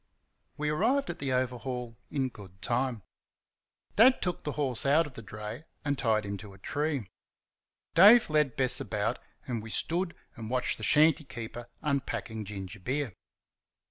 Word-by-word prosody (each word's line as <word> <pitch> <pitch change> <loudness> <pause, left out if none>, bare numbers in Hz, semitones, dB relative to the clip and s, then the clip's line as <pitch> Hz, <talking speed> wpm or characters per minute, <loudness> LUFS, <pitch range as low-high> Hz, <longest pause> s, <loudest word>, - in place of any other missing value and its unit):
We 150 0 -1
arrived 265 - +2
at - - -10
the 140 -2 -2
Overhaul 125 -1 -2
in 135 -2 0
good 95 -5 -13
time. 120 -3 0 0.9
Dad 250 +5 +7
took 180 -2 -2
the 150 - -3
horse 135 -6 0
out 150 +4 +4
of 145 - -10
the 115 - -8
dray 105 +6 -7 0.2
and 145 -1 +1
tied 110 -5 +1
him 100 0 -3
to 100 0 -11
a - - -15
tree. 145 +3 -2 0.9
Dave 210 +7 +8
led 150 -4 +2
Bess 130 -2 +4
about, - - -1 0.3
and 120 -3 -3
we 115 - -9
stood 170 +9 0 0.2
and 110 -1 -7
watched 125 0 0
the - - -7
shanty 155 +1 +5
keeper 120 -1 -7 0.2
unpacking 135 -6 -2
gingerbeer. 105 +6 -4
130 Hz, 155 wpm, -30 LUFS, 110-150 Hz, 0.9 s, Dave